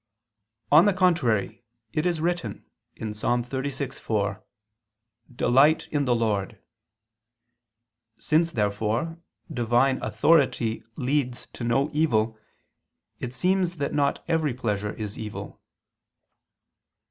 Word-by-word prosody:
On 155 Hz, +5 st, +8 dB
the 205 Hz, -, +4 dB
contrary, 145 Hz, -, +1 dB, 0.3 s
It 155 Hz, +3 st, +1 dB
is 170 Hz, -3 st, 0 dB
written 175 Hz, +2 st, -2 dB, 0.3 s
(Ps. 105 Hz, -1 st, -6 dB
36:4): 120 Hz, -5 st, -2 dB, 0.9 s
"Delight 135 Hz, +7 st, +4 dB
in 145 Hz, -2 st, +1 dB
the 125 Hz, -2 st, +2 dB
Lord." 105 Hz, -4 st, -1 dB, 1.6 s
Since, 165 Hz, +2 st, +1 dB
therefore, 110 Hz, +9 st, -1 dB, 0.3 s
Divine 120 Hz, +2 st, +2 dB
authority 120 Hz, -1 st, +2 dB
leads 130 Hz, -1 st, -1 dB
to -, -, -7 dB
no 135 Hz, +5 st, +1 dB
evil, 115 Hz, -8 st, +2 dB, 0.8 s
it 120 Hz, -, -4 dB
seems 180 Hz, +4 st, +1 dB
that 145 Hz, -, -2 dB
not 140 Hz, -1 st, +1 dB
every 155 Hz, -6 st, +1 dB
pleasure 105 Hz, -4 st, -2 dB
is 105 Hz, -2 st, -6 dB
evil. 105 Hz, -1 st, -7 dB
125 Hz, 100 wpm, -26 LUFS, 110-155 Hz, 1.6 s, On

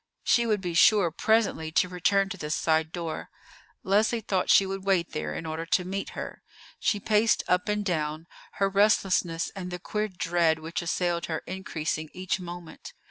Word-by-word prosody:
She 235 Hz, -1 st, +3 dB
would 210 Hz, -3 st, +1 dB
be 175 Hz, -2 st, -3 dB
sure 180 Hz, 0 st, +5 dB
presently 210 Hz, -5 st, +1 dB
to 180 Hz, -, +3 dB
return 195 Hz, +2 st, +1 dB
to 200 Hz, -, -4 dB
this 150 Hz, -3 st, -2 dB
side 160 Hz, 0 st, +1 dB
door. 165 Hz, -2 st, -5 dB, 0.5 s
Leslie 215 Hz, +5 st, +2 dB
thought 190 Hz, -3 st, -1 dB
she 195 Hz, -, +6 dB
would 195 Hz, 0 st, -4 dB
wait 190 Hz, -3 st, +1 dB
there 75 Hz, -1 st, -4 dB
in 165 Hz, -, -5 dB
order 160 Hz, +1 st, -3 dB
to 180 Hz, +1 st, +1 dB
meet 195 Hz, +2 st, -3 dB
her. -, -, -6 dB, 0.4 s
She 205 Hz, -, +1 dB
paced 215 Hz, +2 st, +2 dB
up 180 Hz, +3 st, +1 dB
and 210 Hz, 0 st, 0 dB
down, 155 Hz, -3 st, -2 dB, 0.3 s
her 195 Hz, -, +1 dB
restlessness 195 Hz, -4 st, +2 dB
and 185 Hz, -2 st, -5 dB
the 180 Hz, -, -4 dB
queer 210 Hz, +4 st, -2 dB
dread 170 Hz, -4 st, +1 dB
which 160 Hz, +2 st, -4 dB
assailed 170 Hz, 0 st, -1 dB
her 160 Hz, -2 st, -3 dB
increasing 160 Hz, -4 st, -4 dB
each 185 Hz, +1 st, -2 dB
moment. 175 Hz, -2 st, -9 dB
180 Hz, 180 wpm, -27 LUFS, 165-195 Hz, 0.5 s, she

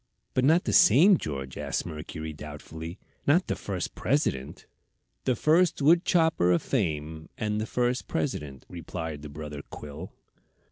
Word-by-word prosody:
"But 130 Hz, -, +2 dB
not 160 Hz, +6 st, +5 dB
the -, -, -1 dB
same 180 Hz, +3 st, +7 dB
George?" 70 Hz, -3 st, -5 dB
asked -, -, -2 dB
Mercury, 80 Hz, -1 st, -6 dB
doubtfully. 80 Hz, +3 st, -8 dB, 0.3 s
"Not 170 Hz, +6 st, +4 dB
the -, -, -2 dB
first 95 Hz, -3 st, -4 dB
President?" 115 Hz, -, -1 dB, 0.6 s
"The 130 Hz, -, +2 dB
first 165 Hz, +7 st, +3 dB
wood 170 Hz, +5 st, +5 dB
chopper 160 Hz, -, +3 dB
of 85 Hz, -, +2 dB
fame, 80 Hz, -, -2 dB
and 105 Hz, 0 st, -1 dB
the 110 Hz, -, -3 dB
first 125 Hz, +1 st, 0 dB
President," 75 Hz, -, -3 dB
replied 80 Hz, -3 st, -6 dB
the 75 Hz, -, -8 dB
brother 75 Hz, 0 st, -7 dB
quill. 75 Hz, +5 st, -8 dB
90 Hz, 145 wpm, -27 LUFS, -, 0.6 s, same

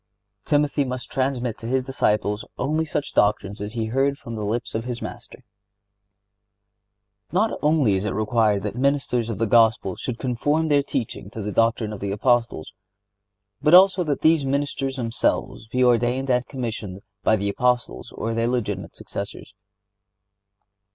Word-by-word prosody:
(72) -, -, -12 dB
Timothy 145 Hz, 0 st, +2 dB
must 125 Hz, -1 st, -5 dB
transmit 130 Hz, -3 st, -1 dB
to 115 Hz, -, -7 dB
his 130 Hz, +1 st, +1 dB
disciples 105 Hz, -5 st, 0 dB
only 155 Hz, +3 st, 0 dB
such 150 Hz, -2 st, -3 dB
doctrines 105 Hz, -1 st, +1 dB
as 105 Hz, +1 st, -5 dB
he 115 Hz, -2 st, -2 dB
heard 135 Hz, +5 st, +1 dB
from 115 Hz, -, -9 dB
the 110 Hz, -2 st, -4 dB
lips 115 Hz, +4 st, -2 dB
of 110 Hz, -, -2 dB
his 120 Hz, -1 st, -4 dB
Master. 120 Hz, +2 st, -9 dB, 1.9 s
Not 210 Hz, +5 st, +2 dB
only 150 Hz, -8 st, +3 dB
is 95 Hz, 0 st, 0 dB
it -, -, 0 dB
required 105 Hz, -1 st, +1 dB
that 105 Hz, -, -3 dB
ministers 130 Hz, -3 st, 0 dB
of 110 Hz, -, -3 dB
the 115 Hz, -, +1 dB
Gospel 110 Hz, -4 st, +3 dB
should 125 Hz, -2 st, -4 dB
conform 145 Hz, +6 st, 0 dB
their 145 Hz, -1 st, +4 dB
teaching 130 Hz, -8 st, -4 dB
to 110 Hz, 0 st, -7 dB
the 105 Hz, -, -3 dB
doctrine 115 Hz, 0 st, +1 dB
of 105 Hz, -, -7 dB
the 100 Hz, -, -3 dB
Apostles, 115 Hz, -5 st, 0 dB, 0.9 s
but 150 Hz, +3 st, +6 dB
also 185 Hz, 0 st, +6 dB
that 150 Hz, -4 st, -2 dB
these 160 Hz, -2 st, +4 dB
ministers 135 Hz, -1 st, -1 dB
should 115 Hz, -3 st, -4 dB, 0.6 s
be 125 Hz, +1 st, +2 dB
ordained 125 Hz, +2 st, +2 dB
and 125 Hz, 0 st, +1 dB
commissioned 110 Hz, -7 st, -5 dB, 0.2 s
by 110 Hz, -, +3 dB
the 100 Hz, -1 st, -1 dB
Apostles 125 Hz, +3 st, -1 dB
or 115 Hz, +1 st, -3 dB
their 115 Hz, +1 st, 0 dB
legitimate 105 Hz, -6 st, -2 dB
successors. 100 Hz, 0 st, -7 dB
120 Hz, 160 wpm, -23 LUFS, 110-135 Hz, 1.9 s, but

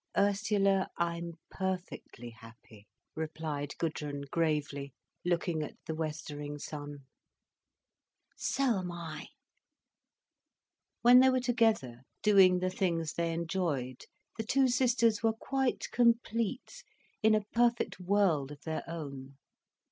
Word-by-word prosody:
"Ursula, 200 Hz, -1 st, +2 dB
I'm 170 Hz, 0 st, -2 dB, 0.2 s
perfectly 180 Hz, -10 st, -5 dB
happy," 115 Hz, -2 st, -16 dB, 0.3 s
replied 155 Hz, -2 st, -4 dB
Gudrun 150 Hz, -3 st, -3 dB
gravely, 145 Hz, -4 st, -1 dB, 0.3 s
looking 170 Hz, -2 st, 0 dB
at 150 Hz, -, -6 dB
the 160 Hz, -, -3 dB
westering 150 Hz, -2 st, -5 dB
sun. 145 Hz, -1 st, -7 dB, 1.3 s
"So 255 Hz, -7 st, +1 dB
am 180 Hz, -1 st, -4 dB
I." 165 Hz, -3 st, -7 dB, 1.8 s
When 245 Hz, +1 st, +9 dB
they 260 Hz, +1 st, +7 dB
were 255 Hz, 0 st, +2 dB
together, 225 Hz, -, +1 dB, 0.2 s
doing 195 Hz, -3 st, +6 dB
the 185 Hz, +1 st, -1 dB
things 170 Hz, -4 st, -1 dB
they 170 Hz, 0 st, -1 dB
enjoyed, 165 Hz, -7 st, -2 dB, 0.3 s
the -, -, 0 dB
two 265 Hz, +4 st, +3 dB
sisters 240 Hz, -3 st, +3 dB
were 225 Hz, -1 st, +2 dB
quite 265 Hz, +3 st, -1 dB
complete 235 Hz, -2 st, +1 dB, 0.4 s
in 220 Hz, -1 st, +5 dB
a 215 Hz, -1 st, 0 dB
perfect 235 Hz, -2 st, +2 dB
world 180 Hz, -7 st, +2 dB
of 145 Hz, 0 st, -10 dB
their 160 Hz, -1 st, -3 dB
own. 140 Hz, -4 st, -7 dB
170 Hz, 110 wpm, -31 LUFS, 150-215 Hz, 1.8 s, When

